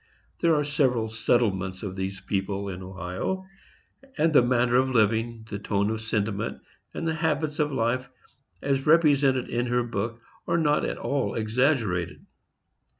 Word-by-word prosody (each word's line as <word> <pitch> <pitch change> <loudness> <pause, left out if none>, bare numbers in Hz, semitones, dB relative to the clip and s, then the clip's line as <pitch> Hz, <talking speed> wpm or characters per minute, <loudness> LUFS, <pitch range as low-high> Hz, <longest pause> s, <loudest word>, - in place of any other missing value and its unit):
There 165 -2 +3
are 150 - +2
several 130 -6 +1
settlements 100 -5 0
of 95 -3 -4
these 95 0 -4
people 100 0 -2
in 95 -1 -6
Ohio, 95 - -4 0.7
and 160 +1 +2
the 145 - +7
manner 120 0 +2
of 130 +1 +3
living, 115 -1 +1
the 100 -2 -5
tone 100 +1 0
of 110 0 -3
sentiment, 110 -1 -2 0.3
and 165 - -4
the 160 - +1
habits 155 -2 -1
of 150 -1 +1
life, 125 0 0 0.5
as 135 0 0
represented 145 -5 +4
in 120 +1 -1
her 120 0 +1
book, 115 0 -3 0.3
are - - +2
not 150 -3 +2
at - - -3
all 140 0 -1
exaggerated. 110 - 0
120 Hz, 150 wpm, -26 LUFS, 100-140 Hz, 0.7 s, the